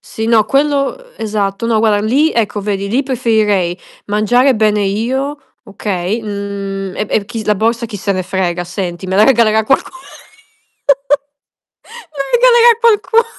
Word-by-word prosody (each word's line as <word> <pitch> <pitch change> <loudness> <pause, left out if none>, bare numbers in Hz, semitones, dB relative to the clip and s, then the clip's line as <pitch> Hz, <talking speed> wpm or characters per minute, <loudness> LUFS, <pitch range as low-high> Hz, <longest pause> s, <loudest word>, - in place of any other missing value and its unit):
Sì 220 0 -6
no 225 -2 +4
quello, 275 - +1
ehm, - - -19
esatto. 210 -1 -2
No 225 -2 +1
guarda 215 -2 +2
lì 285 +8 +2
ecco 210 -2 -1
vedi 200 -1 -3
lì 245 +7 +1
preferirei 215 -9 0 0.3
mangiare 245 +6 +2
bene 210 -1 +1
io, 255 +8 -2 0.3
okay? 200 0 -3
Mhmm, 200 -2 -5
e 210 - -2
e 205 - +1
chi 230 +1 -6
s - - -7
la 210 - +3
borsa 230 +3 0
chi 215 -2 -7
se 200 +1 -2
ne 185 - -2
frega 180 -1 -2
senti, 175 0 -5
me 190 - -1
la 210 - +6
regalerà 220 -4 +3
qualcuno. 270 +8 0 2.2
Me 295 - -16
la 275 - -1
regalerà 475 -1 +5
qualcuno. 460 0 +3
215 Hz, 160 wpm, -15 LUFS, 200-260 Hz, 2.2 s, la